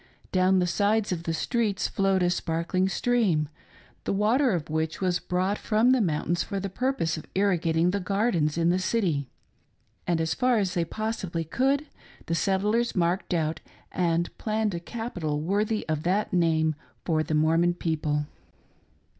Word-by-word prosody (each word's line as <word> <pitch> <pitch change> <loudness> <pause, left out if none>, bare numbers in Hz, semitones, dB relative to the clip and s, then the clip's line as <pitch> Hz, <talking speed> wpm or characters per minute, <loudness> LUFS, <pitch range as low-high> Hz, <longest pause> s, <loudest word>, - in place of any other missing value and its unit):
Down 185 0 +3
the 180 - +3
sides 205 +4 +1
of 170 -2 -3
the 165 - -1
streets 220 -1 0
flowed 195 -1 +1
a 175 - +2
sparkling 175 +2 0
stream 195 -11 +1 0.3
— - - -28
the - - 0
water 225 +7 +3
of 165 -4 -2
which 160 +1 -2
was 180 -2 +1
brought 185 +3 -1
from 225 +3 +3
the 260 -2 +4
mountains 170 -1 0
for 200 - -3
the 195 0 -4
purpose 220 -9 -1
of 155 - -9
irrigating 175 -3 +2
the 200 - -1
gardens 190 -6 0
in 170 0 +3
the 180 - +1
city; 175 - 0 0.8
and, 170 -2 +1
as 160 0 0
far 250 -2 +2
as 195 -4 0
they 170 -1 0
possibly 195 -4 -3
could, 270 - +1 0.4
the 165 - -2
settlers 210 +6 +1
marked 180 +1 0
out 160 -2 0 0.3
and 170 -1 0
planned 215 -1 0
a 170 - -3
capital 175 -7 -4
worthy 205 +6 -1
of 155 -2 -1
that 190 +5 0
name 160 -3 +2 0.3
for 160 -3 +2
the 155 0 -1
Mor 160 +2 +3
mon 175 0 +2
people. 150 -3 -1
180 Hz, 170 wpm, -27 LUFS, 165-210 Hz, 0.8 s, the